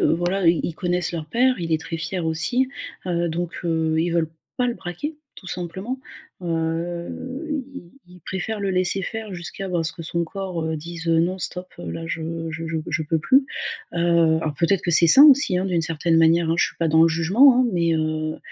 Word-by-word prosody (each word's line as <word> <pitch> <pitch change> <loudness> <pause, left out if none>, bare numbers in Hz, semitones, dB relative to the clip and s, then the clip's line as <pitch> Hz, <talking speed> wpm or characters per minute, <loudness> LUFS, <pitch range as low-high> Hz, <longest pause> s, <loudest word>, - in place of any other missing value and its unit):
voilà, 175 +2 +1
ils 165 0 +4
ils 165 - -3
connaissent 180 -2 -1
leur 160 -3 -5
père, 255 +6 +2
il 165 -1 -3
est 160 - +1
très 165 +1 -5
fier 165 +2 -3
aussi, 240 +12 0 0.4
heu, 170 -1 0
donc 175 +1 -3
heu, 160 -1 0
ils 170 +1 +1
veulent 165 -2 0 0.3
pas 250 -1 +1
le 235 - -1
braquer, 220 - -6 0.2
tout 185 - -11
simplement. 190 +9 -4 0.4
Heu, 175 - -3
ils - - -7 0.2
ils 180 0 -16
préfèrent 200 +3 -4
le 195 -1 -1
laisser 185 +1 +1
faire 220 -3 -5
jusqu'à, 175 +3 -6
bah, 175 -2 0
ce 160 - -2
que 165 - -9
son 170 +1 -1
corps, 180 -1 -4
heu, 160 0 -2
dise: 170 +2 -8
«Non, 170 +3 +2
stop, 180 +1 -3
là, 90 - -6
je 165 0 -4 0.3
je 165 +1 -5
je 165 - -2
je 160 -1 -1
peux 160 +2 0
plus». 265 - +4 0.5
Heu, - - -2 0.4
alors, 155 -3 -2
peut-être 175 +2 +2
que 175 - 0
c'est 170 +1 +6
sain 275 - +9
aussi, 275 -10 +6
hein, 185 - -1
d'une 175 -3 0
certaine 165 +1 +1
manière, 165 0 +4
hein. 165 - +2
Je - - +3
suis - - -10
pas 165 - 0
dans 160 +1 +5
le 165 - +6
jugement, 205 - +5
hein. 255 - +4
Mais 170 -2 +1
heu 155 0 -2
170 Hz, 215 wpm, -23 LUFS, 165-190 Hz, 0.5 s, sain